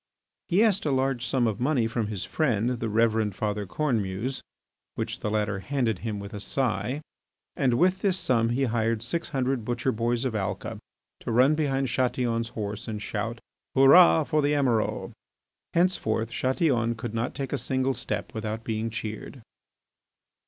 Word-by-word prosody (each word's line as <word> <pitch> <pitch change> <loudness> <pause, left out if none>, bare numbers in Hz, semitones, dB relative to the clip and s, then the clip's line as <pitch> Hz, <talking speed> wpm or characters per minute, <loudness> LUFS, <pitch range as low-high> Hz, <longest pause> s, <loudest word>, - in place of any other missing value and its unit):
He 190 +5 +4
asked 205 -3 +3
a - - +2
large 130 -2 0
sum 125 0 +2
of 110 -1 -1
money 130 -2 +2
from 115 -1 -1
his 105 -4 -4
friend, 120 -6 +1
the 115 - -2
Reverend 110 -2 +2
Father 105 -1 -2
Cornemuse, 115 -1 -1 0.5
which - - -3
the 105 - -2
latter 105 -2 0
handed 120 -3 -1
him 110 -2 -3
with 100 +2 -8
a 105 - -5
sigh. 125 +3 -1 0.5
And 130 -4 +2
with 185 +6 +3
this 195 -2 +1
sum 115 -8 +1
he 125 +3 +1
hired 115 -2 0
six 165 +8 -2
hundred 130 -3 -1
butcher 120 +3 -1
boys 120 +2 0
of 125 - -1
Alca 100 -2 -3 0.4
to - - -4
run 130 +6 +5
behind 135 -3 0
Chatillon's 120 -2 0
horse 105 -2 -5
and 110 -2 -4
shout, 105 +2 -3 0.4
"Hurrah 135 -12 +7
for 155 - +1
the 145 +1 +2
Emiral!" 125 -6 0 0.6
Henceforth 120 -11 +1
Chatillon 125 -2 +1
could 115 0 -6
not 115 +2 -2
take 135 -1 -4
a - - +1
single 130 0 0
step 125 0 -4
without 110 0 -4
being 110 0 -2
cheered. 115 +2 -6
120 Hz, 165 wpm, -27 LUFS, 110-135 Hz, 0.6 s, Hurrah